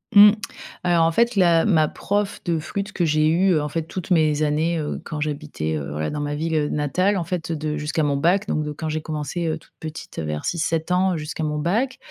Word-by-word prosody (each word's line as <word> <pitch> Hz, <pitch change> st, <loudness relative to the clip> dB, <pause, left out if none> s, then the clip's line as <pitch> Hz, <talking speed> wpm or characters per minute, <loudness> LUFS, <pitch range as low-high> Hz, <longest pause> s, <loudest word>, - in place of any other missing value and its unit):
Mmh. 205 Hz, +1 st, +10 dB, 0.5 s
Alors 170 Hz, -2 st, +3 dB
en 165 Hz, -, +3 dB
fait 235 Hz, +5 st, +2 dB
la 170 Hz, -3 st, +4 dB
ma 160 Hz, -7 st, +4 dB
prof 205 Hz, 0 st, -2 dB
de 165 Hz, -2 st, +1 dB
flûte 200 Hz, +6 st, -4 dB
que 175 Hz, -, 0 dB
j'ai 155 Hz, 0 st, +3 dB
eue, 180 Hz, +3 st, +3 dB
heu, 155 Hz, -, +2 dB
en 150 Hz, -, -3 dB
fait 165 Hz, +1 st, -2 dB
toutes 180 Hz, +2 st, -7 dB
mes 155 Hz, -2 st, +3 dB
années, 160 Hz, +3 st, +1 dB
heu, 150 Hz, -1 st, -3 dB
quand 155 Hz, -2 st, -5 dB
j'habitais, 145 Hz, -, -3 dB
heu, 70 Hz, -2 st, -4 dB
voilà 75 Hz, +1 st, -2 dB
dans 150 Hz, -, -3 dB
ma 145 Hz, 0 st, -2 dB
ville 155 Hz, -1 st, 0 dB
natale. 185 Hz, +7 st, +1 dB
En 175 Hz, -, -1 dB
fait 170 Hz, -2 st, -3 dB
de 155 Hz, -1 st, -2 dB
jusqu'à 150 Hz, +1 st, -1 dB
mon 145 Hz, -1 st, +1 dB
bac, 180 Hz, +7 st, +2 dB
donc 155 Hz, -, 0 dB
de 150 Hz, -, -4 dB
quand 155 Hz, +2 st, -4 dB
j'ai 155 Hz, 0 st, -2 dB
commencé, 155 Hz, +2 st, -3 dB
heu, 160 Hz, 0 st, -1 dB
toute 160 Hz, -, -21 dB
petite 155 Hz, -, -7 dB
vers 75 Hz, -1 st, -3 dB
6-7 165 Hz, 0 st, -1 dB
ans 180 Hz, -1 st, +2 dB
jusqu'à 155 Hz, +1 st, -4 dB
mon 150 Hz, 0 st, -1 dB
bac, 225 Hz, -, 0 dB
160 Hz, 235 wpm, -23 LUFS, 150-175 Hz, 0.5 s, Mmh